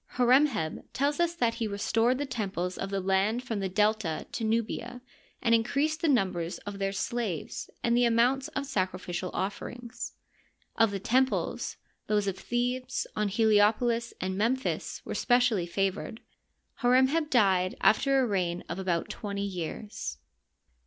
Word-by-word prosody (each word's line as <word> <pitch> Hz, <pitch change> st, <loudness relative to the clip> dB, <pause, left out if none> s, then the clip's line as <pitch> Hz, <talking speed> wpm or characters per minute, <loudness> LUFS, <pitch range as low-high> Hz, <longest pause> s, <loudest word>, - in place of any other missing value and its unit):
Hor 245 Hz, 0 st, +4 dB
em 285 Hz, +3 st, +7 dB
heb 160 Hz, -, -4 dB
tells 285 Hz, +4 st, 0 dB
us 340 Hz, 0 st, +1 dB
that 235 Hz, -8 st, +1 dB
he 230 Hz, -1 st, -2 dB
restored 225 Hz, +4 st, +1 dB
the 290 Hz, -, -2 dB
temples 195 Hz, -8 st, -3 dB
of 195 Hz, -, -4 dB
the 195 Hz, 0 st, -1 dB
land 195 Hz, +5 st, +1 dB
from 225 Hz, -5 st, -3 dB
the 195 Hz, -1 st, -2 dB
Delta 210 Hz, -4 st, +1 dB
to -, -, -4 dB
Nubia 230 Hz, +2 st, -1 dB, 0.4 s
and 230 Hz, -2 st, +3 dB
in 225 Hz, -1 st, +5 dB
creased 305 Hz, +6 st, 0 dB
the 330 Hz, -, +2 dB
numbers 185 Hz, -, +1 dB
of 205 Hz, -1 st, -6 dB
their 195 Hz, 0 st, 0 dB
slaves 200 Hz, -4 st, -3 dB
and 235 Hz, 0 st, +3 dB
the 245 Hz, 0 st, +4 dB
amounts 245 Hz, +4 st, +3 dB
of 310 Hz, -, -3 dB
the 280 Hz, -, -10 dB
sacrificial 185 Hz, -4 st, -2 dB
offerings. 235 Hz, +5 st, -5 dB, 0.6 s
Of 225 Hz, -, +4 dB
the 200 Hz, -, -3 dB
temples, 260 Hz, +6 st, 0 dB, 0.3 s
those 210 Hz, -1 st, +2 dB
of 195 Hz, -2 st, -2 dB
Thebes, 250 Hz, +1 st, -1 dB
On 210 Hz, 0 st, +1 dB
Heliopolis, 220 Hz, +3 st, +2 dB
and 185 Hz, 0 st, -2 dB
Memphis 240 Hz, +6 st, -1 dB
were -, -, -4 dB
specially 245 Hz, -7 st, +2 dB
favored. 195 Hz, +5 st, -2 dB, 0.6 s
Hor 245 Hz, 0 st, +3 dB
em 260 Hz, +1 st, +6 dB
heb 310 Hz, 0 st, 0 dB
died 190 Hz, -7 st, +3 dB
aifter 270 Hz, +3 st, +4 dB
a -, -, +2 dB
reign 180 Hz, -5 st, -1 dB
of 170 Hz, -, -4 dB
about 175 Hz, -3 st, -1 dB
twenty 200 Hz, -2 st, -4 dB
years. 180 Hz, -, -5 dB
220 Hz, 165 wpm, -29 LUFS, 195-245 Hz, 0.6 s, em